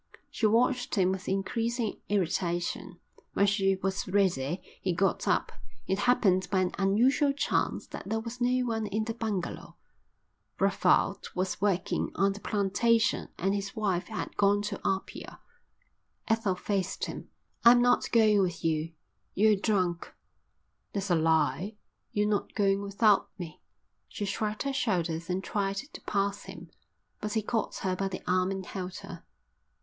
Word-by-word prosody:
She 220 - +2
watched 245 +3 +2
him 185 -2 +3
with 190 -1 -4
increasing 225 +3 -1
irritation: 175 -1 -1 0.3
When 200 - +3
she 195 -1 +2
was 190 +1 -2
ready 185 -5 +1 0.2
he 185 - 0
got 190 +3 0
up. - - +1 0.3
It 190 - -1
happened 200 -6 +3
by 190 -1 +2
an 185 -1 0
unusual 245 +9 +3
chance 280 - 0
that - - -8
there 225 - 0
was 230 +2 -7
no 250 +1 +2
one 225 -2 -1
in 215 +2 -1
the 225 +1 -3
bungalow. 215 -6 -4 0.8
Brevald - - +2
was 185 0 -2
working 195 -3 0
on 195 +2 +2
the 200 - -9
plantation 215 +3 +1
and 195 +3 0
his 200 -1 -3
wife 195 -5 -1
had 220 - -5
gone 200 0 +4
into 205 -1 -4
Apia. 195 0 -3 0.9
Ethel 225 -4 +1
faced 195 0 -2
him. - - -7 0.3
"I'm 240 +1 +8
not 245 0 +3
going 215 -3 +5
with 175 -3 -2
you. 160 0 0 0.4
You're 215 +1 +5
drunk." 185 -4 -1 0.8
"That's 195 -1 -2
a - - +5
lie. 160 +4 +1 0.4
You're 210 0 +1
not 210 -1 -1
going 195 -1 +2
without 200 +1 +3
me." 170 -5 -8 0.5
She 205 - -4
shrugged 210 +2 -2
her 275 0 -1
shoulders 175 -9 -1
and 185 +1 -1
tried 195 -1 -1
to 275 +10 -7
pass 200 0 -1
him, - - -10 0.5
but 210 - -3
he 220 -2 0
caught 225 +1 -1
her 185 -1 +1
by 195 +1 -1
the 190 -1 -6
arm 185 0 +2
and 190 -1 -4
held 185 -1 -5
her. 180 -4 -9
200 Hz, 155 wpm, -29 LUFS, 185-220 Hz, 0.9 s, I'm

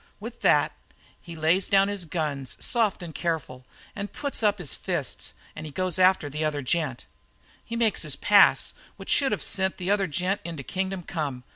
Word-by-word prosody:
"With 235 +3 -8
that, - - +4 0.5
he 170 - -9
lays 165 +4 +2
down 195 0 +4
his 200 -3 -3
guns, 150 -6 -3
soft 220 -6 0
and 165 -2 -7
careful, 150 -7 -3 0.3
and 205 0 -5
puts 285 -4 -2
up 210 -1 +3
his 175 -7 -3
fists, 170 -8 -3 0.2
and 155 -1 -7
goes 185 -2 0
for 185 -4 +4
the 150 +2 -3
other 150 -2 -1
gent. 135 -2 -1 0.6
"He 230 - -6
makes 230 -3 +1
his 150 -4 -2
pass, 205 +8 +5 0.2
which - - -6
should 275 -3 +4
have 210 - -1
sent 190 -1 0
the 185 +2 -1
other 200 -2 +2
gent 180 +6 -1
into 165 -5 -6
kingdom 190 +3 -3
come. 140 -7 -4
180 Hz, 180 wpm, -26 LUFS, 155-200 Hz, 0.6 s, pass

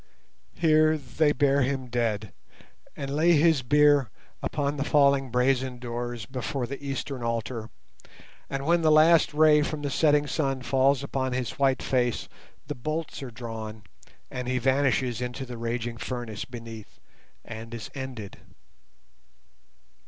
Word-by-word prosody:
Here 155 -1 +4
they 145 +2 +1
bear 140 -1 +2
him 130 0 -1
dead 115 -5 -2 0.6
and 140 0 -4
lay 165 +3 +4
his 160 -2 +4
bier 145 -1 +4 0.3
upon 145 -1 -2
the 140 - 0
falling 140 -3 +3
brazen 125 +1 +1
doors 120 -2 -5
before 130 +2 -3
the 140 +3 -7
eastern 135 -1 -4
altar, 115 -1 -3 0.8
and 135 0 -3
when 170 +2 +3
the 160 - +3
last 160 +2 +6
ray 150 0 +5
from 150 0 -3
the 145 - -2
setting 150 0 +3
sun 135 -2 -1
falls 135 +1 +2
upon 130 -2 -2
his 125 -1 -2
white 135 -1 +2
face 125 -2 0 0.4
the - - -4
bolts 155 +5 -4
are 135 - -6
drawn 110 -3 -7 0.5
and 125 -1 -4
he 130 0 0
vanishes 130 -2 +1
into 125 +2 -4
the 120 -2 -8
raging 115 0 -3
furnace 120 -4 -5
beneath 115 -4 -10 0.5
and 115 0 -8
is 115 -3 -7
ended. 130 -7 -7
130 Hz, 140 wpm, -27 LUFS, 120-145 Hz, 0.8 s, last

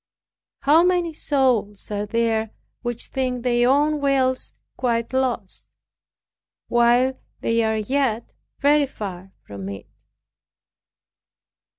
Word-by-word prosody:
How 295 +4 +5
many 355 -2 +1
souls 250 -10 0
are 205 0 -2
there 225 0 0 0.3
which 240 -1 -3
think 255 -2 -2
their 240 0 +3
own 295 +2 +2
wills 265 -2 +1 0.2
quite 235 -1 -1
lost, 245 -7 -2 1.0
while 240 +2 +3 0.2
they 230 0 +1
are 220 0 +1
yet 235 0 -1 0.3
very 290 0 +4
far 190 -6 -7
from 100 -1 -7
it! 100 -1 -8
240 Hz, 100 wpm, -23 LUFS, 220-270 Hz, 1.0 s, How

